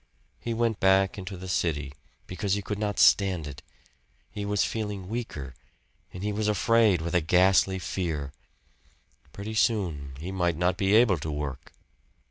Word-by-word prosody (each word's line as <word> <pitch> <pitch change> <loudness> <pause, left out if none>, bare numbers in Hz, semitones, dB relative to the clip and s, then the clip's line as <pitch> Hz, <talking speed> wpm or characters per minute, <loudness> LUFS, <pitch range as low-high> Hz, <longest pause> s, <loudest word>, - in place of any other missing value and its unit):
He 120 - -4
went 115 -2 0
back 95 +1 +3
into 95 0 -7
the 95 +1 -8
city, 75 -6 -1 0.3
because 95 +1 -2
he 100 - -4
could 105 +1 -4
not 105 -1 -2
stand 95 -6 +4
it. 70 -3 -8 0.7
He 105 -1 -5
was 105 0 +1
feeling 105 -4 -4
weaker, 90 - -5 0.6
and 90 - -8
he 105 0 -1
was 105 +1 -1
afraid 105 -2 +3
with 85 +2 -4
a 90 - +3
ghastly 95 +3 +3
fear. 80 -6 -3 1.0
Pretty 105 +2 -6
soon 85 - 0
he 85 +5 -5
might 85 -4 0
not 90 +1 +1
be 100 +1 +2
able 110 -7 +5
to 80 - -5
work! 75 -3 -5
95 Hz, 160 wpm, -27 LUFS, 85-105 Hz, 1.0 s, able